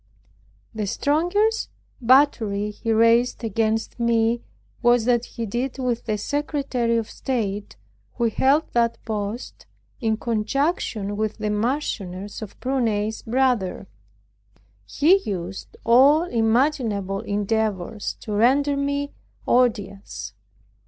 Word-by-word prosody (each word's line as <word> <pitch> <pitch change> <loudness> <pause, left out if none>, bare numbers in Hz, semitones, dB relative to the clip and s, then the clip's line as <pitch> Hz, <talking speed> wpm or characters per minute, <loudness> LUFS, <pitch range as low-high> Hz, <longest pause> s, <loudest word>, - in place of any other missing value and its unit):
The 215 -2 -3
strongest 355 - +1 0.3
battery 230 -5 +3
he 225 +2 -3
raised 230 +2 +3
against 225 +1 -1
me 235 0 +2 0.4
was 240 -2 +4
what 240 -1 +2
he 230 - -5
did 245 +6 -3
with 250 -3 -2
the 215 -2 -1
Secretary 270 -2 -1
of 225 -2 -2
State, 210 -6 -3 0.4
who 235 - +1
held 270 +7 +3
that 235 -1 +2
post 215 +1 -5 0.3
in 220 -3 0
conjunction 225 - -1
with 215 0 -2
the 215 -1 -2
Marchioness 210 -5 -2
of 215 - -9
Prunai's 220 -5 -1
brother. 240 -6 0 1.0
He 325 - +4
used 190 -3 -6
all 275 +7 +6
imaginable 225 - +1
endeavors 205 0 -2
to 215 - -5
render 275 +7 +3
me 280 0 -2 0.3
odious. 200 - 0
230 Hz, 105 wpm, -23 LUFS, 210-260 Hz, 1.0 s, all